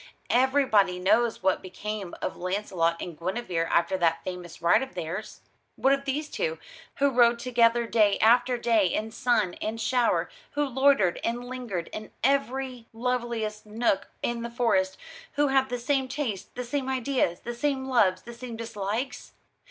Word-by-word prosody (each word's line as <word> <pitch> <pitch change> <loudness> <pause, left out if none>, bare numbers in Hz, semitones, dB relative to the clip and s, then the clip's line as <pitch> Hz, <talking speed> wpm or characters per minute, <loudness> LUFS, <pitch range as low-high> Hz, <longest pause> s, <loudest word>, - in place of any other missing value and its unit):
Everybody 245 -8 +3
knows 220 +5 +2
what 190 - +2
became 195 0 -6
of - - -2
Launcelot 180 -3 -1
and 175 - -6
Guinevere 180 -1 -2
after 185 +2 +2
that 165 -1 +2
famous 180 -2 -7
ride 170 +7 +4
of 265 0 -6
theirs. 180 +5 -5 0.3
What 270 - +3
of 275 0 -1
these 290 +3 -2
two, 480 +6 -2 0.4
who 280 0 +2
rode 240 -1 +5
together 235 -1 +3
day 215 -3 +3
after 245 +3 +4
day 230 -5 +3
in 215 +5 -2
sun 220 -6 +1
and 220 +1 -3
shower, 245 +1 +2 0.3
who 290 0 +1
loitered 265 -8 +3
and 240 +1 -2
lingered 240 -9 -4
in 215 0 -7
every 265 -2 0
loveliest 230 -3 -2
nook 215 -2 0 0.2
in 240 -1 -1
the 235 - -4
Forest, 230 -6 +1 0.4
who 290 0 +2
had 265 -1 +3
the 245 - -2
same 265 +2 0
tastes, 255 -7 -3
the 250 - -3
same 265 +2 -2
ideas, 260 -9 0
the 240 - -5
same 265 +2 -1
loves, 210 -8 +2
the 235 - -9
same 235 0 -7
dislikes? 225 +2 -4
235 Hz, 160 wpm, -27 LUFS, 195-255 Hz, 0.4 s, rode